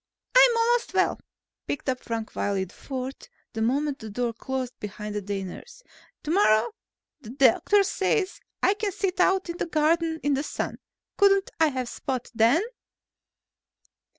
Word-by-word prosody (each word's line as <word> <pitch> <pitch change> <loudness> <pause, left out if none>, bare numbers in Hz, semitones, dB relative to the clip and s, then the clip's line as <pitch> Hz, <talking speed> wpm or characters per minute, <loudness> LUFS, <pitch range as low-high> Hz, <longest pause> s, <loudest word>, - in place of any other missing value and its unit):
"I'm - - +7
almost 475 +1 +1
well," - - +2 0.5
piped 285 - -4
up 255 -1 0
Frank 225 -2 -4
Wiley 200 -2 0
IV, 190 - -14 0.6
the 225 - -3
moment 275 +5 0
the 220 - -8
door 235 +2 -2
closed 255 +1 -4
behind 210 0 -6
the 210 - -2
day 200 0 -3
nurse. 485 - -10 0.4
"Tomorrow, 265 - +3 0.5
the 220 - -11
doctor 275 - +4
says, 390 0 0 0.2
I - - +5
can 415 -1 -2
sit 375 -1 -2
out 380 +1 +3
in 340 0 -5
the - - -2
garden 320 +1 +1
in 290 - +2
the 275 - +1
sun. 300 - -4 0.4
Couldn't 395 -1 +4
I 320 - +5
have 260 -4 -2
Spot 255 0 -4
then?" 235 - +4
285 Hz, 150 wpm, -26 LUFS, 225-380 Hz, 0.6 s, I'm